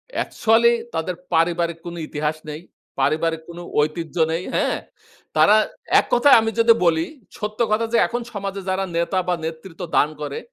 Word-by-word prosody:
Actually 235 +1 +3 0.2
তাদের 165 +3 -2 0.2
পারিবারিক 170 0 +1
কোন 175 0 -6
ইতিহাস 150 +1 -2
নেই। 150 +1 -6 0.4
পারিবারিক 160 +1 +1
কোন 170 0 -9 0.2
ঐতিহ্য 155 +2 -3 0.2
নেই, 165 +2 -2
হ্যাঁ? - - +1 0.6
তারা 210 - +6 0.4
এক - - -1
কথায় 255 +4 +7
আমি 225 0 -1
যদি 230 0 +7
বলি, 165 -1 +3 0.3
সত্য 210 0 -5
কথা 220 +2 +2
যে - - +5
এখন 240 +1 -3
সমাজে 200 -1 -4
যারা 190 +1 0
নেতা 170 +3 0
বা, 180 - +2
নেতৃত্ব 165 +2 -7 0.2
দান 150 - +4
করে 145 -1 -4
170 Hz, 160 wpm, -22 LUFS, 160-210 Hz, 0.6 s, কথায়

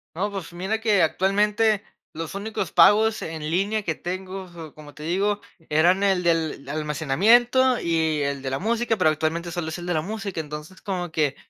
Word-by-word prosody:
No, 200 +5 -1
pues, 190 -3 -6
mira 195 +6 -2
que 210 -5 +3
actualmente, 205 +5 +2 0.3
los 165 +1 -6
únicos 210 +3 -4
pagos 220 +1 +5
en 160 -1 -5
línea 205 +5 0
que 165 - -1
tengo, 185 +3 -6
so 165 -3 -10
como 145 -2 -13
te 150 - -10
digo, 200 +5 0 0.3
eran 175 +5 +3
el 190 -3 +2
del 165 -5 0
almacenamiento, 200 - +3
y 160 -2 0
el 140 -1 -2
de 135 - -3
la 135 - -1
música, 225 +4 0
pero, 170 -5 +4
actualmente, 160 +3 -2
sólo 170 -2 -3
es 160 - -5
el 175 - -7
de 175 - -1
la 155 - +1
música. 200 0 -5
Entonces, 150 +4 -9
como 180 -4 -4
que 150 -3 0
180 Hz, 190 wpm, -24 LUFS, 155-205 Hz, 0.3 s, pagos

